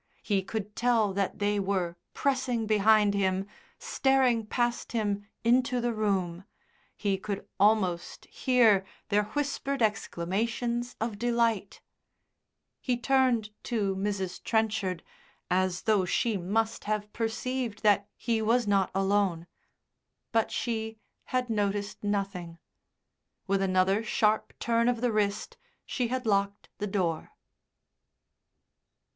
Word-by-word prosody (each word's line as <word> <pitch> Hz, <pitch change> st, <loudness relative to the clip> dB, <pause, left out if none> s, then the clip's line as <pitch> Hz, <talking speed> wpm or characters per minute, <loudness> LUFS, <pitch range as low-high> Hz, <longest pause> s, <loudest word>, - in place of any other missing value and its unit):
He 200 Hz, -3 st, +1 dB
could 210 Hz, +1 st, -5 dB
tell 230 Hz, -5 st, +2 dB
that 195 Hz, 0 st, -1 dB
they 205 Hz, 0 st, +1 dB
were 190 Hz, -3 st, -1 dB, 0.2 s
pressing 255 Hz, -4 st, 0 dB
behind 215 Hz, -1 st, +4 dB
him, 190 Hz, -1 st, +1 dB, 0.3 s
staring 255 Hz, -5 st, +2 dB
past 240 Hz, +1 st, -1 dB
him 205 Hz, -3 st, -1 dB, 0.2 s
into 245 Hz, +1 st, +3 dB
the 240 Hz, 0 st, 0 dB
room, 190 Hz, -5 st, -1 dB, 0.5 s
he 195 Hz, -2 st, 0 dB
could 200 Hz, 0 st, -5 dB
almost 195 Hz, -4 st, +2 dB
hear 230 Hz, -7 st, +3 dB, 0.3 s
their 210 Hz, 0 st, +2 dB
whispered 280 Hz, -2 st, -1 dB
exclamations 225 Hz, +5 st, -1 dB
of 220 Hz, -2 st, -3 dB
delight. 235 Hz, -4 st, 0 dB, 1.0 s
He 250 Hz, -2 st, -1 dB
turned 250 Hz, -4 st, +2 dB
to 205 Hz, -5 st, 0 dB
Mrs. 190 Hz, -2 st, -3 dB
Trenchard 215 Hz, -6 st, 0 dB, 0.5 s
as 185 Hz, 0 st, +1 dB
though 210 Hz, -4 st, +3 dB
she 225 Hz, +4 st, +1 dB
must 220 Hz, +5 st, -1 dB
have 210 Hz, 0 st, -2 dB
perceived 230 Hz, 0 st, -3 dB
that 205 Hz, -1 st, +4 dB
he 230 Hz, -2 st, -1 dB
was 235 Hz, +2 st, +2 dB
not 200 Hz, -2 st, +2 dB
alone. 195 Hz, -3 st, +1 dB, 0.9 s
But 225 Hz, -1 st, +2 dB
she 220 Hz, -2 st, -3 dB, 0.3 s
had 255 Hz, -1 st, -1 dB
noticed 205 Hz, -2 st, -2 dB
nothing; 195 Hz, -4 st, -2 dB, 0.9 s
with 195 Hz, 0 st, +1 dB
another 190 Hz, +2 st, +2 dB
sharp 215 Hz, 0 st, +1 dB
turn 235 Hz, 0 st, +2 dB
of 245 Hz, -2 st, 0 dB
the 245 Hz, 0 st, +1 dB
wrist 205 Hz, -2 st, -1 dB, 0.3 s
she 250 Hz, -2 st, -1 dB
had 255 Hz, +1 st, -3 dB
locked 200 Hz, -1 st, 0 dB
the 210 Hz, -, -2 dB
door. 180 Hz, -5 st, -2 dB
210 Hz, 115 wpm, -29 LUFS, 195-235 Hz, 1.0 s, behind